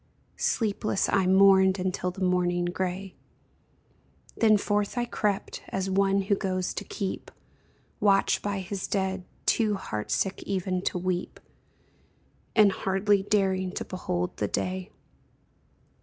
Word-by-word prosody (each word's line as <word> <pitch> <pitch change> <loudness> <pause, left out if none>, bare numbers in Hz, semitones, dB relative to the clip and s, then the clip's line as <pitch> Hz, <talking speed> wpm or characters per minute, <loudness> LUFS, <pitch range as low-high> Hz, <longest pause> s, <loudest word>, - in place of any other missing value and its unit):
Sleepless 215 -3 0
I 195 -2 +2
mourned 190 0 +6
until 185 -1 -1
the 185 +1 -5
morning 175 -1 +1
gray; 185 +2 -3 1.2
Then 215 -2 +5
forth 205 +3 -1
I 240 - +1
crept, 205 -4 -2
as 190 0 -2
one 195 0 +2
who 200 +2 +1
goes 185 -2 -1
to - - -4
keep 195 -2 -5 0.7
Watch 200 -1 +3
by 200 -1 -2
his 190 +1 -4
dead, 190 -2 -1 0.2
too 215 -3 +2
heartsick 190 - -2
even 185 -1 -2
to - - 0
weep. 180 0 -3 1.2
And 210 -2 +6
hardly 195 +1 +1
daring 190 -2 +1
to - - -4
behold 180 -1 -3
the - - 0
day. 185 +1 -3
190 Hz, 125 wpm, -27 LUFS, 185-200 Hz, 1.2 s, mourned